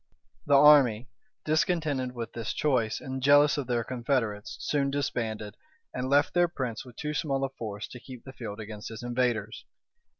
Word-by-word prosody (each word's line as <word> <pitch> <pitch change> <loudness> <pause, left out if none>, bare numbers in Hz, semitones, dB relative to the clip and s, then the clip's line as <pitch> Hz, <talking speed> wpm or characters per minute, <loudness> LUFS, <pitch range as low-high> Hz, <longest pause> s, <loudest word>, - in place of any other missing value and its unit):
The 140 -1 +6
army, 135 -6 +6 0.4
discontented 155 -5 0
with 120 -2 -6
this 115 -2 -4
choice, 125 -7 0
and 130 0 -5
jealous 145 +2 +5
of 140 - -4
their 120 -2 0
confederates, 115 -4 -2
soon 140 -2 0
disbanded, 115 -7 -3 0.4
and 125 +1 -3
left 145 +1 +3
their 175 0 +4
prince 125 -9 -4
with 125 -3 -14
too 150 0 -4
small 135 -3 -1
a 135 - 0
force 110 -6 -6
to 125 - -10
keep 125 -1 -11
the 135 - -10
field 110 -4 -7
against 105 -1 -7
his 110 +1 -8
invaders. 120 -2 -1
130 Hz, 170 wpm, -28 LUFS, 115-140 Hz, 0.4 s, The